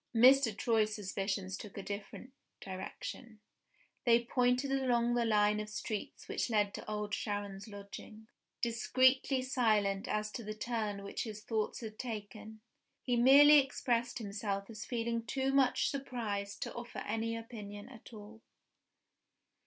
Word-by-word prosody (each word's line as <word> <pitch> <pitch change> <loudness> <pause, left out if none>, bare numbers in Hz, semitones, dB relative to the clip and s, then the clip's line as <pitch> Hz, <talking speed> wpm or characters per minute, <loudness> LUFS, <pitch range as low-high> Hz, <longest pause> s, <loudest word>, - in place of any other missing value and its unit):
Mr. 250 -2 +6
Troy's 215 -2 +2
suspicions 195 -1 -3
took 205 0 -9
a 200 - -4
different 205 +6 -7 0.3
direction: 210 +4 -7 0.6
they 235 -1 +5
pointed 250 +2 +1
along 245 -3 +2
the 240 -1 +2
line 210 -1 +3
of 210 0 -5
streets 210 0 -5
which - - -1
led 205 -3 +2
to - - -7
Old 210 -1 -3
Sharon's 205 -1 -3
lodgings. 205 +1 -10 0.4
Discreetly 255 +3 +3
silent 215 -6 +1
as 215 0 -1
to 235 - -6
the 215 0 -5
turn 215 -3 -3
which 200 - -4
his 215 -2 -6
thoughts 215 +1 -2
had 215 -2 -8
taken, 220 -2 -7 0.4
he 245 - +1
merely 285 +5 +8
expressed 245 -3 0
himself 200 -1 -3
as 215 -1 -7
feeling 230 -1 -2
too 265 +3 -1
much 270 -2 +3
surprised 225 -7 -3
to - - -6
offer 240 0 -6
any 225 +1 -1
opinion 210 -2 -8
at 245 -3 -13
all. 220 0 -11
220 Hz, 140 wpm, -33 LUFS, 205-245 Hz, 0.6 s, merely